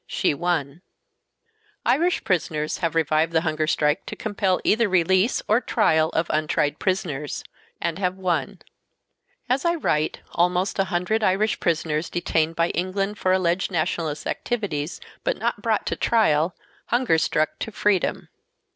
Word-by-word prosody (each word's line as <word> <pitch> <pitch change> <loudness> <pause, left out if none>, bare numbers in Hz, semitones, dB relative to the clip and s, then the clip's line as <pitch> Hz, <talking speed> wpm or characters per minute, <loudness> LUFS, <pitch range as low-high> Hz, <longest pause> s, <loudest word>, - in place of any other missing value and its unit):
She - - +1
won. 155 -1 -2 1.0
Irish 340 +6 +2
prisoners 155 -5 -1
have 165 -2 -1
revived 160 0 +2
the 160 - +3
hunger 155 -2 -1
strike 150 -1 +1
to - - -5
compel 200 -4 0
either 225 0 +3
release 185 +5 +2
or 220 +4 +3
trial 160 -11 +2
of 165 - +1
untried 150 -1 0
prisoners 165 -7 -2 0.4
and 170 +1 -2
have 185 -1 -1
Lyon. 185 -3 -2 0.8
As 260 +2 +1
I 340 0 +2
write, 155 - 0
almost 180 +3 +1
a 195 - +3
hundred 185 +5 0
Irish 205 +2 +2
prisoners 160 -2 0
detained 165 -2 0
by 170 +1 +2
England 195 +3 -2
for 185 - +1
alleged 185 0 +1
nationalist 160 -3 -2
activities, 175 -10 -3 0.2
but - - 0
not - - -2
brought - - 0
to - - -1
trial, 170 -7 +2 0.3
hunger 240 -10 +2
struck 155 -1 0
to 220 - -4
freedom. 205 -3 0
175 Hz, 145 wpm, -24 LUFS, 155-200 Hz, 1.0 s, the